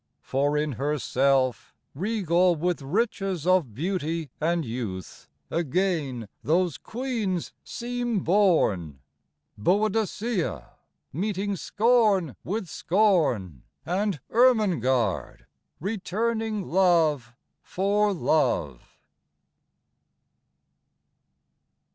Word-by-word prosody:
For 145 +2 0
in 150 0 0
her 145 +4 -1
self, 130 -1 +1 0.2
regal 180 -1 +2
with 175 +1 -1
riches 195 - -1
of 180 - +2
Beauty 165 - -2
and 165 0 +1
youth, 110 - -6 0.2
again 160 - -1 0.2
those 165 -1 +1
Queens 225 -8 -3
seem 240 -3 -3
born 155 - +2 0.6
BOADICEA, 205 - 0 0.4
meeting 200 +4 -2
scorn 205 - +2
with 205 +3 -3
scorn, 155 - +1 0.2
And 190 0 -1
ERMENGARDE, 170 - +2 0.3
returning 220 +2 -2
love 160 -9 +2 0.3
for 205 +3 +1
love. 85 - 0
175 Hz, 75 wpm, -26 LUFS, 140-205 Hz, 0.6 s, regal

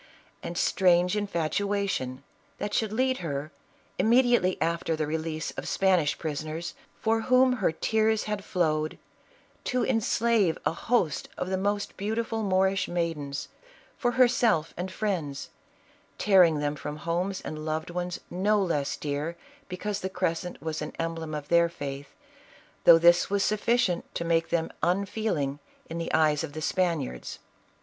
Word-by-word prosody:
And 170 - -5
strange 180 0 +3
infatuation 200 -6 -1 0.3
that 205 - -4
should 220 -1 +1
lead 260 +3 +1
her, 150 -2 -4 0.5
immediately 240 -5 +4
after 165 -1 0
the 155 -1 -1
release 155 +1 -3
of - - -6
Spanish 185 -6 +2
prisoners, 155 +2 -4 0.3
for 225 0 +1
whom 255 +2 +4
her 180 - +3
tears 220 +5 +1
had 210 -2 -3
flowed, 155 -5 0 0.7
to 250 0 +1
enslave 225 -5 +2
a - - +2
host 180 -5 0
of 185 - -3
the - - +2
most 205 +1 -2
beautiful 225 +2 -2
Moorish 190 -1 +2
maidens, 165 -5 -3 0.5
for 245 - 0
herself 235 -10 +3
and 180 +2 -4
friends, 175 -10 -3 0.7
tearing 180 -6 +5
them 145 0 -1
from 150 +1 -6
homes 175 +4 -2
and 155 0 -6
loved 155 +2 -3
ones 180 0 -3
no 205 +4 +2
less 160 -7 0
dear 150 +3 -3 0.3
because 205 +3 -3
the 190 - -2
cres 180 -3 0
cent 180 - -7
was 160 -1 -3
an 150 - -5
emblem 165 -1 -3
of 145 -1 -5
their 170 0 +4
faith, 140 -4 -6 0.8
though 165 - +10
this 175 +1 +5
was 200 0 +1
suf 210 0 0
ficient 230 -8 +2
to 170 - -2
make 165 -1 +1
them 165 -1 0
unfeeling 180 -7 0 0.3
in 165 - -3
the 165 - -3
eyes 155 -1 +3
of 150 -3 -6
the 155 - -5
Span 175 -3 +1
iards. 60 0 -6
175 Hz, 150 wpm, -27 LUFS, 155-205 Hz, 0.8 s, though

